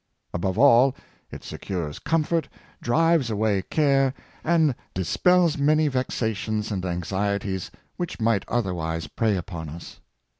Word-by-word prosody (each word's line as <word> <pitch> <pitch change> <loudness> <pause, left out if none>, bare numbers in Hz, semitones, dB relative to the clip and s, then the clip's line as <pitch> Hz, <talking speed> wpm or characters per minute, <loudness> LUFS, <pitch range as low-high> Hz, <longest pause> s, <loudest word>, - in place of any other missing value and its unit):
Above 95 +2 -1
all, 130 0 +6 0.3
it - - -9
secures 85 -6 -5
comfort, 165 0 0 0.3
drives 160 0 +2
away 105 -2 +1
care, 135 - +2 0.3
and 160 -4 +3 0.2
dispels 170 - +2
many 155 +2 +3
vexations 110 -5 -2
and 95 -3 -2
anxieties 95 +2 -2 0.3
which 175 -6 -4
might 110 -3 +2
otherwise 85 -8 -2
prey 110 -4 0
upon 85 -3 -6
us. 85 +3 -10
110 Hz, 115 wpm, -25 LUFS, 95-145 Hz, 0.3 s, all